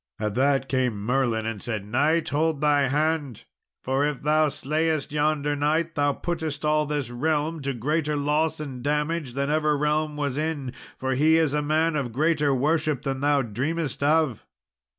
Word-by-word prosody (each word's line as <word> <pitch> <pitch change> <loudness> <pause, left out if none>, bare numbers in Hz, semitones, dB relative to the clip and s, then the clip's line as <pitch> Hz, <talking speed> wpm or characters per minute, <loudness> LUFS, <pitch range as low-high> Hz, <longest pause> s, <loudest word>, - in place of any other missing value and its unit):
At 105 -1 -2
that 135 +2 +2
came 125 -6 0
Merlin 120 -3 +1
and 110 -3 -4
said, 110 -4 -4
"Knight, 145 +9 +1
hold 155 0 0
thy 145 -2 +3
hand, 150 -3 -1 0.4
for 135 +2 0
if 145 -2 -2
thou 155 +1 +3
slayest 155 +1 -1
yonder 150 -1 0
knight, 155 +3 0
thou 145 -2 +2
puttest 160 -1 -4
all 150 0 +2
this 145 -5 -2
realm 155 +4 -1
to 140 0 -2
greater 150 +5 -1
loss 150 +2 0
and 135 -5 -6
damage 150 -1 -1
than 140 +1 -1
ever 150 -1 +2
realm 150 +1 0
was 145 -1 -2
in; 150 -5 -3 0.2
for 130 0 -1
he 155 +5 +4
is 160 -3 +2
a 150 - +1
man 155 +2 +1
of 135 -5 -2
greater 150 +2 +1
worship 150 +1 +1
than 135 -1 -2
thou 145 0 +2
dreamest 140 +7 -3
of." 150 -4 +1
150 Hz, 170 wpm, -25 LUFS, 135-155 Hz, 0.4 s, he